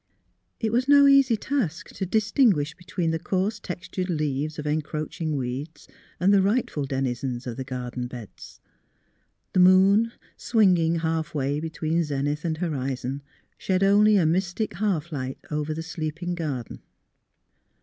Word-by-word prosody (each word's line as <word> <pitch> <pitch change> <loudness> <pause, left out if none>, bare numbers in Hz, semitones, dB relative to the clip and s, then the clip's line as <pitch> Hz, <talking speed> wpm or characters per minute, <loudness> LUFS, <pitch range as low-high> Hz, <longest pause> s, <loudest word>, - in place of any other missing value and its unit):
It 220 -2 -1
was 250 +3 +1
no 285 0 +7
easy 275 -4 +5
task 215 - -2
to 190 - -4
distinguish 205 - +2
between 175 -1 -3
the 160 - -1
coarse 195 +5 -1
textured 185 0 -5
leaves 150 -2 -2
of 150 - -5
encroaching 155 +1 -2
weeds 135 +5 -5 0.3
and 190 +3 +4
the 200 - +5
rightful 200 - 0
denizens 130 -2 -2
of 120 -2 -4
the 130 - -4
garden 125 -1 -5
beds. 120 -4 -11 0.9
The 185 - +3
moon, 190 +5 +5 0.2
swinging 180 -8 +3
halfway 155 -3 -1
between 160 +1 -1
zenith 145 0 -2
and 160 -2 -1
hori 140 -6 -2
zon, 130 +3 -5 0.4
shed 185 0 0
only 205 +2 +5
a 175 - +3
mystic 185 +6 0
half 175 -6 -1
light 130 -3 -4
over 150 0 -2
the 160 +1 -4
sleeping 165 +1 -4
garden. 145 -9 -4
160 Hz, 140 wpm, -25 LUFS, 145-195 Hz, 0.9 s, no